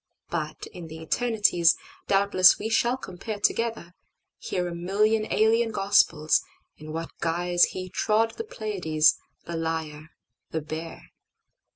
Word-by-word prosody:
But 155 -2 -4
in 175 -2 -9
the 160 0 -9
eternities, 180 -2 +2 0.3
Doubtless 195 -2 +5
we 220 - -4
shall 240 +3 +2
compare 205 -1 -7
together, 225 -5 -1 0.5
hearA 180 -1 -3
million 210 +5 0
alien 225 +1 +3
Gospels, 195 -7 +3 0.3
in 155 0 -10
what 165 +1 -5
guiseHe 175 +2 0
trod 225 +1 +1
the 450 - -6
Pleiades, 180 - +1 0.3
the 170 - -5
Lyre, 160 -1 -4 0.4
the 160 - -3
Bear. 160 +2 -8
180 Hz, 115 wpm, -26 LUFS, 160-215 Hz, 0.5 s, Doubtless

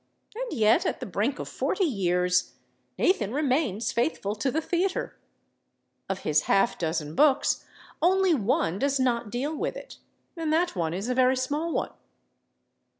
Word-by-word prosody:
And - - -4
yet, 225 +3 +3
at - - -2
the 255 - -5
brink 215 +6 -1
of - - -6
forty 390 - -1
years, 180 - +1 0.4
Nathan 220 - +2
remains 255 - 0
faithful 235 -4 -1
to 215 +6 -1
the 300 - 0
theater; 355 +3 -1 0.9
of 190 -1 -3
his 150 0 +1
half 195 +4 +3
dozen 160 -2 -2
books, 290 - +3 0.4
only 375 +1 +4
one 200 - 0
does 280 +1 +1
not 240 -3 0
deal 270 +8 -2
with - - -3
it, - - -11 0.4
and 325 -2 -2
that 335 -4 +1
one 165 -2 -1
is 195 +5 -4
a 250 - 0
very 255 +1 +3
small 290 +6 -1
one. - - -1
255 Hz, 155 wpm, -27 LUFS, 195-310 Hz, 0.9 s, only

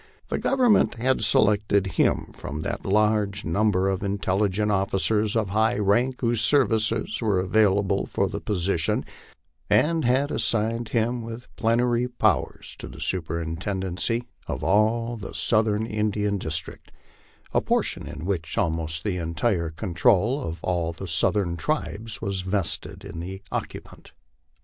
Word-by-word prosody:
The - - -1
Government 250 - +3
had 125 +1 0
selected 105 -1 +3
him 95 - 0
from 75 +2 -6
the - - -2
large 105 0 +1
number 95 +2 +1
of 95 0 -1
intelligent 100 +1 0
officers 105 +2 +2
of 110 -4 0
high 110 +4 +2
rank 120 +6 +1
whose 115 -2 +1
services 110 -2 +3
were 105 -5 +1
available 100 0 +2
for - - 0
the - - -5
position, 90 -4 0 0.6
and 165 +1 +3
had 130 +4 +2
assigned 115 +1 0
him 120 +1 0
with 115 +1 -9
plenary 120 +2 +1
powers 125 -1 -1
to - - -5
the - - -11
superintenden 85 +2 -2
cy 115 +4 0 0.2
of 115 +2 +1
the 95 - -7
Southern 110 -1 +1
Indian 105 -2 -1
District, 80 -2 -4 0.6
a - - +3
position - - -1
in 80 - -7
which 85 -3 -3
almost 80 -5 -1
the 100 -4 -1
entire 85 +1 -1
con 90 +3 -6
trol 120 - +3
of 80 0 -6
all 85 -2 -1
the 95 +3 -7
southern 85 +2 +1
tribes 115 - -2
was 100 -3 -2
vested 95 -1 -2
in 85 - -7
the 95 +3 -7
occupant. - - -6
105 Hz, 140 wpm, -25 LUFS, 95-115 Hz, 0.6 s, Government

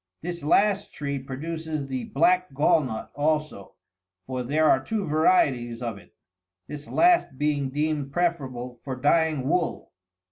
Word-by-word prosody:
This 175 0 -5
last 200 +6 +2
tree 140 -1 -3
produces 155 +3 -5
the 130 -2 -4
black 180 0 +2
gall 150 +2 +4
nut 110 -4 -6
also 150 -7 -2 0.2
— 90 0 -61
for 130 +2 -3
there 150 +5 +2
are 130 -2 +4
two 210 +5 -2
varieties 140 -7 +2
of 115 -4 -4
it 90 - -21 0.3
— 90 0 -59
this 150 0 -8
last 345 - +3
being 145 -1 0
deemed 145 0 -2
preferable 135 -8 -2
for 135 -2 -4
dyeing 150 +1 +2
wool. 175 +2 -1
145 Hz, 150 wpm, -25 LUFS, 130-160 Hz, 0.3 s, gall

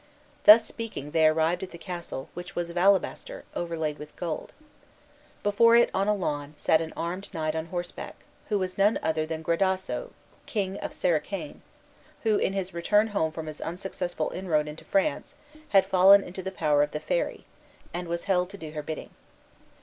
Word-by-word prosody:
Thus 220 +2 +10
speaking 220 - -6
they 160 0 +5
arrived 160 +2 +2
at 190 - -5
the 170 - -10
castle, 170 -6 -6
which 175 +2 -8
was 170 -1 -2
of - - -12
alabaster, 190 +1 +1
overlaid 160 -3 -2
with 150 0 -10
gold. 165 -3 -4 0.9
Before 230 +3 +5
it, 235 - +5
on 195 +1 +1
a 210 - +3
lawn, 150 -5 -3
sat 160 0 +3
an 160 -1 -4
armed 180 +4 -4
knight 155 -1 -1
on 160 0 -3
horseback, 175 0 -5 0.3
who 210 - +2
was 185 0 -3
none 205 +3 +4
other 155 -1 0
than 160 0 -4
Gradasso, 190 - 0 0.4
king 195 -3 -2
of - - -6
Sericane, 180 - -1 0.6
who, 220 -3 +3
in 190 - 0
his 190 -1 -3
return 210 +6 +2
home 160 -6 0
from 160 0 -6
his 155 -1 -8
unsuccessful 175 -2 -3
inroad 160 -5 0
into 150 +1 -8
France, 195 +10 0 0.3
had 195 -1 +5
fallen 195 +1 +7
into 185 +2 -7
the 190 - -4
power 150 -5 +2
of 145 - +2
the 150 - -2
fairy, - - -2 0.5
and 175 0 -4
was 170 0 -3
held 180 -2 +1
to 200 - -9
do 160 -4 -8
her 155 -1 -4
bidding. 155 +1 -6
175 Hz, 180 wpm, -27 LUFS, 160-195 Hz, 0.9 s, Thus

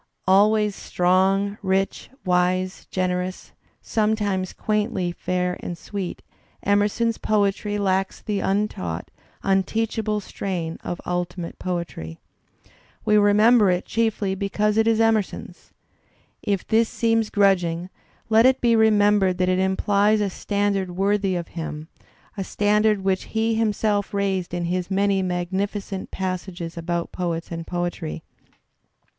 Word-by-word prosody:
Always 210 +2 +4
strong, 190 +3 +1
rich, 195 0 -1 0.2
wise, 185 +1 0
generous, 185 0 -2 0.3
sometimes 210 -4 0
quaintly 210 -4 -1
fair 180 +1 -2
and 175 - -5
sweet, 195 +1 -5 0.4
Emerson's 205 +3 +1
poetry 205 0 0
lacks 195 -1 0
the 205 -2 -2
untaught, 195 - -2 0.3
un 195 0 +3
teachable 220 +1 -1
strain 180 -5 -4
of 175 - -4
ultimate 175 -1 -3
poetry. 170 - -4 0.9
We 210 - +4
remember 210 +1 +5
it 180 0 0
chiefly 220 -3 0
because 205 +2 0
it 220 0 +3
is 225 -1 +3
Emerson's. 225 -3 -1 0.7
If 200 -3 -1
this 225 +1 +3
seem 225 -1 +2
grudging, 180 -3 +2 0.4
let 225 +2 +5
it 260 0 +3
be 235 -1 +3
remembered 205 -4 +4
that 180 0 +1
it 185 0 +2
implies 200 +3 +2
a 205 -2 0
standard 200 -1 -1
worthy 195 0 +1
of 175 -1 -4
him, 160 -1 -6 0.5
a 195 - -3
standard 210 +1 +2
which 190 -1 0
he 225 +1 +2
himself 210 -2 0
raised 195 -3 -1
in 175 0 -2
his 180 +1 -2
many 195 0 +2
magnificent 190 +2 -3
passages 185 -2 -4
about 170 0 -3
poets 170 -2 -3
and 165 -1 -5
poetry. 175 - -3
195 Hz, 125 wpm, -23 LUFS, 180-210 Hz, 0.9 s, remember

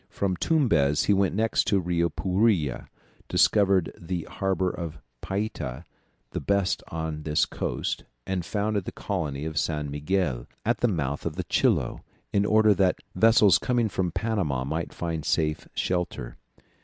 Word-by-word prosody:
From 95 -2 -1
Tumbez 90 - +2
he 105 - +3
went 95 -2 +2
next 110 +2 +2
to - - +3
the 95 - +3
Rio 85 -1 +1
Puira, 95 - +1 0.4
discovered 100 -4 +3
the 85 0 -4
harbour 95 -2 -1
of 80 -3 -6 0.2
Payta, 95 - -3 0.5
the - - -3
best 100 -2 +1
on 80 -2 -4
this 75 0 +2
coast, - - -3 0.2
and 95 -2 -2
founded 105 +1 -1
the - - -4
colony 75 -8 -3
of 80 -1 -1
San 75 -3 -2
Miguel, 75 -4 -1 0.2
at 120 +3 +1
the 120 - +3
mouth 70 - -2
of - - -3
the - - -2
Chilo, - - +1 0.3
in 100 0 +2
order 110 0 +5
that 95 -2 +2 0.2
vessels 110 0 +5
coming 120 -3 +1
from 90 -2 -1
Panama 90 - -1
might 80 +5 -3
find 85 -3 -3
a - - -6
safe 75 -2 0
shelter. 90 -9 -2
90 Hz, 155 wpm, -26 LUFS, 80-100 Hz, 0.5 s, order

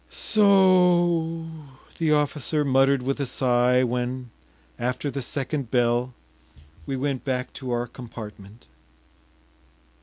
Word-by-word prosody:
“So 210 -2 +2
o!...” 175 -4 +3 0.5
the 160 -2 +1
officer 150 0 +1
muttered 135 0 +3
with 135 +3 -2
a 140 - -1
sigh 125 0 +2
when, 125 0 -3 0.5
after 125 +4 -2
the 140 - -4
second 135 0 -3
bell, 120 0 +1 0.7
we 135 - -2
went 135 0 -2
back 130 -2 -3
to 130 -3 -7
our 120 0 -1
compartment. 110 -3 -11
130 Hz, 115 wpm, -24 LUFS, 125-150 Hz, 0.7 s, o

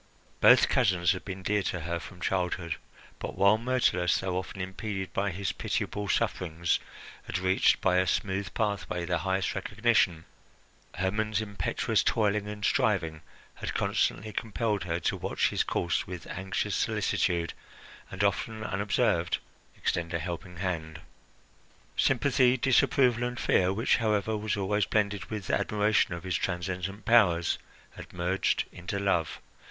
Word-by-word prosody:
Both - - +7
cousins 90 -2 +3
had 90 - -3
been 95 -1 -7
dear 105 +1 +1
to 90 -2 -3
her 85 +2 -2
from 90 +1 -11
childhood; 90 -3 -1 0.4
but - - -5
while 100 +3 +5
Myrtilus, 115 -8 +2
though 95 -1 -2
often 95 +1 -4
impeded 95 0 -4
by 100 +1 0
his 95 +1 -2
pitiable 105 0 -3
sufferings, 85 -1 0 0.5
had - - -2
reached 95 +1 +3
by 90 - +3
a 95 0 +2
smooth 95 +2 -1
pathway 100 -5 -1
the 85 0 0
highest 95 +2 0
recognition, 100 -4 +1 0.7
Hermon's 105 +3 0
impetuous 100 -5 0
toiling 105 -1 +1
and 105 -1 -4
striving 90 -11 +1 0.3
had - - -5
constantly 110 +2 0
compelled 105 -2 -1
her 85 -1 -1
to - - 0
watch - - 0
his - - 0
course 85 - -1
with 90 -2 -7
anxious 95 +1 -2
solicitude 85 -2 0 0.6
and, 95 +1 -3
often 110 +2 0
unobserved, 100 -3 +1 0.4
extend 85 0 -1
a - - +3
helping 90 +1 -6
hand. 80 -4 -3 0.9
Sympathy, 125 0 +3
disapproval, 125 -1 +3
and 125 0 -3
fear, 90 0 +3
which, 110 +5 +2
however, 110 -1 +1
was 105 0 -2
always 100 0 0
blended 105 -2 0
with 105 -4 -4
admiration 105 -4 +2
of 85 - -8
his 95 -2 -2
transcendent 95 +3 -3
powers, 95 -8 +4 0.3
had - - -11
merged 90 +2 0
into 90 +3 -5
love. 85 -7 0
95 Hz, 140 wpm, -29 LUFS, 90-105 Hz, 0.9 s, Both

